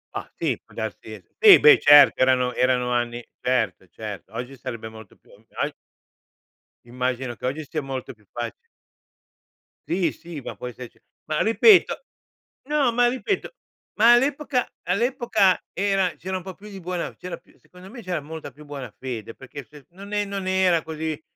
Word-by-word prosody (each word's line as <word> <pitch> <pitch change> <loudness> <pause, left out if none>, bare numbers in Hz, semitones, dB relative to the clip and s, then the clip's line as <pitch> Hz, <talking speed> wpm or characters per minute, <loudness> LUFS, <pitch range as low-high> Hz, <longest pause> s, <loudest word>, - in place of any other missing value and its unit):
Bah! - - -5
Sì, - - -2
può - - -21
darsi - - -6 0.2
sì, 425 -4 +9
beh 150 - +8
certo 145 -2 +7
erano 125 -1 +3
erano 125 -1 +1
anni 120 0 -2 0.2
certo, 110 -7 0
certo, 105 -2 -8
oggi 125 +3 -5
sarebbe 120 -3 -7
molto 110 -2 -13
più - - -25
ogg - - -20 1.4
Immagino 125 0 -3
che - - -8
oggi 145 +4 -3
sia 155 +1 -3
molto 135 -2 -6
più 105 -2 -28
faci 120 - -4 1.4
Sì, 180 -1 0
sì, 170 -3 -9
ma 135 - -7
può 125 - -7
esserci 125 0 -10 0.3
ma 155 0 -1
ripeto 375 - +5 0.6
no, 295 -4 +2
ma 245 0 +4
ripeto, 260 - -2 0.5
ma 230 +3 +7
all'epoca 270 0 +1 0.2
all'epoca 220 -1 +2
era 195 -1 +1
c'era 185 +1 -4
un 180 - -8
po' 190 - -7
più 210 +1 -13
di 195 -2 -9
buona 175 0 -4
c'era 180 -1 -7
più 170 - -26
secondo 180 +1 -15
me 235 +2 -10
c'era 180 -5 -3
molta 155 -1 -8
più 150 +4 -15
buona 140 -5 -7
fede, 115 -4 -6
perché 135 +2 -10
se 145 -2 -16
non 200 +3 -11
è 205 0 +1
non 195 -1 -5
era 185 -3 +3
così 160 -1 -4
155 Hz, 170 wpm, -24 LUFS, 125-195 Hz, 1.4 s, sì